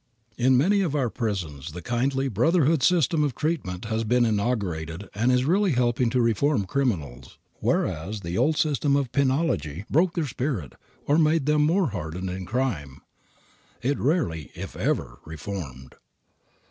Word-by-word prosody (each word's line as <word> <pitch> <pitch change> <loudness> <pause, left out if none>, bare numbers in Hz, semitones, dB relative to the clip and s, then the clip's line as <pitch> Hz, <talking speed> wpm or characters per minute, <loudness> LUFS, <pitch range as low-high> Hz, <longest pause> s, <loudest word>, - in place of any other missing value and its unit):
In 125 +2 +3
many 195 +9 +3
of 165 -6 -1
our 130 -6 0
prisons, 80 - -4
the 90 - -7
kindly, 135 +4 0
brotherhood 155 - +2
system 165 0 +3
of 140 -5 -1
treatment 135 - -2
that 110 - -6
has 110 0 0
been 120 +2 +3
inaugurated 100 -6 -2
is 125 +4 +2
really 185 +2 +2
helping 120 -1 +2
to 125 +1 +1
reform 115 0 +2
criminals, 80 - -2 0.2
whereas 100 +7 -1
the 85 -1 -4
old 155 +9 +2
system 145 -2 +2
of 140 -4 0
penology 140 - +1
killed 75 -1 -7
men, 100 - -7
broke 170 +4 +3
their 165 -3 0
spirit, 125 - -3 0.3
or 145 +3 +3
made 155 -2 +3
them 150 0 +3
more 170 +1 +2
hardened 90 0 -4
in 95 0 -6
crime. 100 - -2 0.8
It 140 +3 0
rarely, 130 - 0
if - - -7
ever, - - -2
reformed. 75 -6 -7
125 Hz, 160 wpm, -25 LUFS, 95-145 Hz, 0.8 s, In